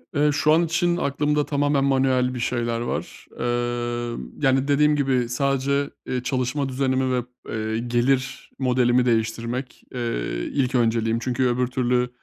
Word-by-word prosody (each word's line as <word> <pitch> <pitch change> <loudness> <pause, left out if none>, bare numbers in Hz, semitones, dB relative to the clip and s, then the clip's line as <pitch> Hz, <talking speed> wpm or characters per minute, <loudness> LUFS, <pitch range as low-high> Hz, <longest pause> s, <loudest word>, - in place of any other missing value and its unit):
Eee, 150 +1 +3
şu 150 +1 +2
an 165 +2 +4
için 175 +1 +1
aklımda 150 0 0
tamamen 145 -1 +1
manuel 130 -2 +2
bir 125 - -4
şeyler 120 -1 -1
var, 120 - -5
emm, 120 0 -3
yani 135 -1 +2
dediğim 150 +1 +4
gibi, 130 -4 +1
sadece, 140 +2 0 0.2
eee, 125 -1 -3
çalışma 130 +2 -1
düzenimi 130 0 0
ve, 125 -1 0 0.3
eee, 110 0 -2
gelir 125 +2 0
modelimi 125 -1 +3
değiştirmek, 115 +2 -2
eee, - - -3 0.5
ilk 135 -2 0
önceliğim. 115 -1 +2
Çünkü 125 +1 0
öbür 125 +1 +1
türlü 125 -1 0
130 Hz, 140 wpm, -23 LUFS, 120-140 Hz, 0.5 s, an